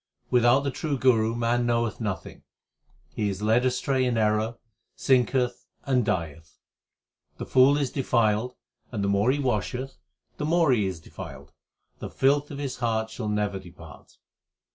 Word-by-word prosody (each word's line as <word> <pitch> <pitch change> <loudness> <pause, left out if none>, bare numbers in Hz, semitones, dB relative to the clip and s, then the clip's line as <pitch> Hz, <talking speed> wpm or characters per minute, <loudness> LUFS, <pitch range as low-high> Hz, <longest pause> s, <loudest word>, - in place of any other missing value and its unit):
Without 125 +2 +4
the 140 0 -2
true 145 +2 -3
Guru 115 -3 +3
man 120 +1 0
knoweth 115 -2 0
nothing; 105 -4 -5 0.7
he 105 -1 -1
is 100 +1 -5
led 110 +3 +3
astray 130 +1 0
in 125 -2 0
error, 110 +1 +1 0.4
sinketh, 125 -1 +1 0.2
and 130 -3 +2
dieth. 80 -5 -4 0.8
The - - -5
fool 135 +2 +5
is 140 -4 -1
defiled, 120 -3 +1 0.4
and 105 -5 -3
the - - +1
more 100 +4 +2
he 135 - +2
washeth, 130 0 -2 0.4
the 150 - -3
more 165 -3 +3
is 95 -6 0
he 80 - -17
defiled; - - -10 0.5
the - - -6
filth 140 +2 +1
of 145 - -7
his 140 -3 -4
heart 110 -2 -1
shall 110 -2 -4
never 105 -2 -1
depart. 85 -5 -14
120 Hz, 155 wpm, -26 LUFS, 105-130 Hz, 0.8 s, fool